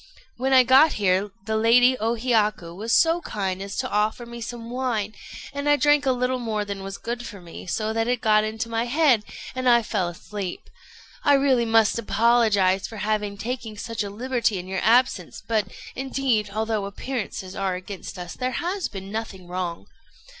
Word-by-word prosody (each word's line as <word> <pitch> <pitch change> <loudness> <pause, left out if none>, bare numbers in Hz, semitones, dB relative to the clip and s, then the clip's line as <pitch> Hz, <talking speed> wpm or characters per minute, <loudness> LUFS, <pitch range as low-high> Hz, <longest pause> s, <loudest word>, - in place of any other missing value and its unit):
When 260 +2 -1
I 260 -1 +7
got 265 +6 +6
here, 195 0 +1 0.2
the 220 0 -1
Lady 245 +3 +5
O 225 +2 0
Hiyaku 215 -7 0
was 220 +5 -4
so 330 +7 +4
kind 195 - -3
as 200 0 -6
to - - -2
offer 215 +3 0
me 235 0 -9
some 230 0 -6
wine; 240 -5 -1 0.4
and 285 +1 -1
I 290 - +6
drank 290 -1 +3
a - - +5
little 250 0 0
more 215 -3 -2
than 200 -1 -5
was 195 0 -6
good 240 +1 -4
for 205 - -9
me, 175 +1 -11
so 215 +4 -1
that 225 0 0
it 245 -1 +1
got 215 -2 +4
into 220 +1 -3
my 230 0 -1
head, 260 -4 +3 0.3
and 255 0 +1
I 235 -1 +5
fell 200 -4 -1
asleep. 185 +2 -6 0.5
I 285 -2 +5
must 235 -6 +3
really - - -5
apologize 205 -4 +3
for 225 - -9
having 210 0 -1
taken 225 0 -5
such 230 0 -3
a 200 - -5
liberty 235 0 -1
in 180 0 -6
your 190 0 -2
absence; 225 -5 +2
but, 215 -3 +1 0.3
indeed, 260 -5 0
although 215 0 -1
appearances 200 -3 -5
are 195 -2 -1
against 185 +1 -8
us, 175 -1 -6
there 255 0 -3
has 365 +2 -2
been 195 -1 -8
nothing 210 -5 -5
wrong." 175 -1 -4
220 Hz, 190 wpm, -24 LUFS, 200-245 Hz, 0.5 s, I